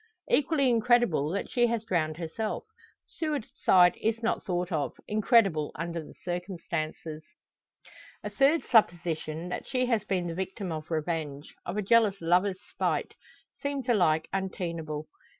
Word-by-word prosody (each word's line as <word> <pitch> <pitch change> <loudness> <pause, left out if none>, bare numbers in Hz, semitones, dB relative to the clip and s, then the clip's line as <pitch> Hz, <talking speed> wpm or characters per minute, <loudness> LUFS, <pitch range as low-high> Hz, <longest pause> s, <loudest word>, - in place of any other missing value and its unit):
Equally 295 - +3
incredible 235 - +3
that 200 +4 -2
she 240 -1 +3
has 230 -2 -1
drowned 160 -7 0
herself. 175 +6 -3 0.4
Suicide 215 - +2
is 225 +1 0
not 230 - 0
thought 180 0 -2
of 155 -4 -1
incredible 210 - +3
under 170 -1 -4
the - - -13
circumstances. 170 -3 -4 1.0
A - - -3
third 290 +4 +3
supposition, 170 -6 +1
that - - -5
she 255 -1 +1
has 230 -4 +1
been 190 -3 -1
the 170 - -3
victim 190 +1 -4
of 155 -1 -5
revenge 155 -3 -3
of 175 +4 -3
a 210 - 0
jealous 210 -2 +4
lover's 180 +3 +2 0.2
spite - - -1 0.5
seems 280 -3 -3
alike 170 -9 +3
untenable. 165 -5 -3
180 Hz, 135 wpm, -29 LUFS, 165-230 Hz, 1.0 s, jealous